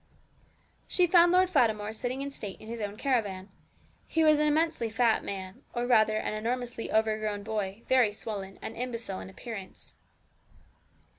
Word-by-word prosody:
She 360 Hz, -, +3 dB
found 345 Hz, 0 st, +6 dB
Lord 370 Hz, +1 st, +5 dB
Fatimore 220 Hz, -, +1 dB
sitting 255 Hz, +4 st, -3 dB
in 280 Hz, -, -5 dB
state 205 Hz, -7 st, -5 dB
in 215 Hz, -, -12 dB
his 230 Hz, 0 st, -5 dB
own 205 Hz, 0 st, -4 dB
caravan. 210 Hz, -8 st, -1 dB, 0.6 s
He 325 Hz, -, +1 dB
was 305 Hz, -1 st, +5 dB
an 300 Hz, -, +3 dB
immensely 310 Hz, -6 st, +1 dB
fat 225 Hz, 0 st, +2 dB
man, 195 Hz, +4 st, -6 dB
or 240 Hz, 0 st, 0 dB
rather 215 Hz, -3 st, +4 dB
an 215 Hz, -, -2 dB
enormously 235 Hz, +2 st, -3 dB
overgrown 215 Hz, -1 st, 0 dB
boy, 210 Hz, 0 st, -3 dB
very 255 Hz, -5 st, +4 dB
swollen, 200 Hz, -2 st, -6 dB
and -, -, -5 dB
imbecile 230 Hz, -5 st, -4 dB
in -, -, -8 dB
appearance. 195 Hz, 0 st, -9 dB
225 Hz, 155 wpm, -29 LUFS, 210-255 Hz, 0.6 s, found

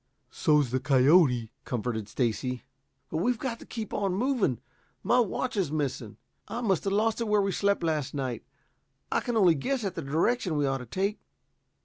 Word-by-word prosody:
"So's 150 Hz, -5 st, +2 dB
the 130 Hz, -, +1 dB
coyote," 130 Hz, -3 st, +4 dB
comforted 110 Hz, -3 st, -3 dB
Stacy. 125 Hz, +1 st, -1 dB, 0.5 s
"But 155 Hz, -, -1 dB
we've 240 Hz, +8 st, +1 dB
got 230 Hz, 0 st, -4 dB
to -, -, -13 dB
keep 220 Hz, -3 st, -6 dB
on 195 Hz, -2 st, 0 dB
going. 240 Hz, -, +1 dB, 0.4 s
My 245 Hz, -, +3 dB
watch 245 Hz, +3 st, -1 dB
is 185 Hz, -8 st, 0 dB
missing. 135 Hz, -8 st, -3 dB, 0.3 s
I 235 Hz, -, -4 dB
must 195 Hz, -7 st, +1 dB
have 195 Hz, -, 0 dB
lost 220 Hz, +2 st, +1 dB
it 230 Hz, -, -1 dB
where 210 Hz, 0 st, +3 dB
we 195 Hz, -, 0 dB
slept 200 Hz, 0 st, +1 dB
last 150 Hz, -4 st, -1 dB
night. 130 Hz, -4 st, -3 dB, 0.7 s
I -, -, +2 dB
can 240 Hz, -2 st, -2 dB
only 185 Hz, -6 st, +6 dB
guess 255 Hz, -, -2 dB
at 195 Hz, -3 st, -2 dB
the -, -, -4 dB
direction 165 Hz, -, 0 dB
we 145 Hz, -, +2 dB
ought 135 Hz, -1 st, 0 dB
to 125 Hz, -, -9 dB
take. 195 Hz, -, -1 dB
165 Hz, 190 wpm, -28 LUFS, 130-210 Hz, 0.7 s, only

